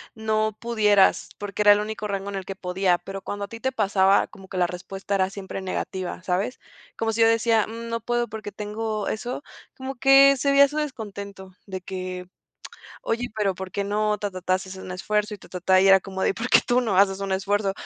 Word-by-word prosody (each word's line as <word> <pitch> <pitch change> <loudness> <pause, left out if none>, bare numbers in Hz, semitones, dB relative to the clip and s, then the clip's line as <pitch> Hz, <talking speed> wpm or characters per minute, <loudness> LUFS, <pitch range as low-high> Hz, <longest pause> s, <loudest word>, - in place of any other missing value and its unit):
no 215 -1 -1
pudieras, 210 -4 +3
porque 205 0 -4
era 205 - +7
el 205 - +5
único 215 0 -4
rango 200 -1 -3
en 200 - -5
el 190 -1 -5
que 195 - -6
podía, 180 -1 +1
pero 195 +2 -8
cuando 205 +1 -4
a - - -14
ti 225 +2 -9
te 260 +2 -1
pasaba, 200 -4 +3
como 195 -1 -15
que 185 - -5
la 180 - +3
respuesta 190 +3 -5
era 190 -1 +2
siempre 195 -1 -7
negativa, 185 -1 -4
¿sabes? 195 +7 -1 0.4
Como 225 0 -1
si 230 - 0
yo 225 - +7
decía: 230 -1 +3
"Mm, 230 +1 -7
no 230 0 -2
puedo 240 0 -1
porque 215 -1 -7
tengo 210 +1 -4
eso". 245 +5 -4 0.3
Como 265 +1 -6
que 270 +2 +7
se 280 +2 0
veía 280 0 +7
su 295 - -6
descontento 200 -9 -6 0.2
de 190 -1 -5
que: 185 -1 -6 0.8
"Oye, 235 +2 -2
y - - -4
pero, 210 -3 -1
¿por 190 0 -7
qué 200 - -2
no? 210 +1 0
Ta 205 -1 -3
ta 185 -1 -8
ta, 185 0 +2
si 190 - -10
haces 190 0 -8
un 185 - -7
esfuerzo 210 +3 -1
y 210 - -6
ta - - -16
ta 180 - -6
ta". 185 +1 +4
Y 195 - +4
era 195 0 +8
como 190 0 -7
de: - - +3
"¿Y - - +1
por 235 +4 -4
qué - - +7
tú 245 +1 +3
no 200 -6 +1
haces 195 -1 +3
un 195 -1 -2
esfuerzo?". 195 +1 0
205 Hz, 240 wpm, -24 LUFS, 190-225 Hz, 0.8 s, era